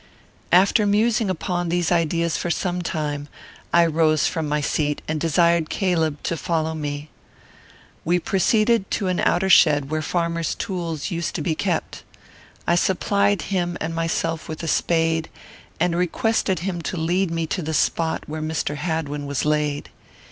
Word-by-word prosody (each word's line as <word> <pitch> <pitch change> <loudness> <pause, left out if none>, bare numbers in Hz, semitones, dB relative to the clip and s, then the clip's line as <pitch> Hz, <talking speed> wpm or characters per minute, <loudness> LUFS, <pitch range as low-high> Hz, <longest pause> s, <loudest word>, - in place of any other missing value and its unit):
After 195 +4 +5
musing 215 +1 +2
upon 175 -1 -2
these 175 0 0
ideas 170 -1 +1
for 175 - -2
some 180 +1 -1
time, 150 -3 -3 0.4
I 170 0 +5
rose 155 -1 +2
from 160 -3 -1
my 150 0 +1
seat, 150 0 0
and 155 0 -1
desired 170 0 +2
Caleb 165 -6 0
to 170 - -1
follow 160 -1 -1
me. 145 -1 -5 0.9
We 175 +2 +2
proceeded 215 +4 +2
to 195 -4 -1
an 180 - 0
outer 180 +2 +2
shed 150 -6 +5
where 155 0 0
farmers' 170 0 -1
tools 170 -3 -4
used 170 0 -3
to 155 - -2
be 160 - 0
kept. - - -2 0.6
I - - +2
supplied 200 +3 +2
him 175 -1 0
and 160 +1 -3
myself 165 -1 -2
with 155 +1 -6
a - - -3
spade, 165 0 +1 0.5
and 170 0 +1
requested 185 +1 0
him 175 -2 -3
to 180 - -4
lead 175 +3 +1
me 165 0 -1
to 180 +4 -3
the 160 0 -3
spot 160 +1 0
where 155 +1 -5
Mr. 155 -1 -2
Hadwin 150 -3 -3
was 140 -1 -2
laid. 150 -1 0
165 Hz, 160 wpm, -22 LUFS, 155-180 Hz, 0.9 s, After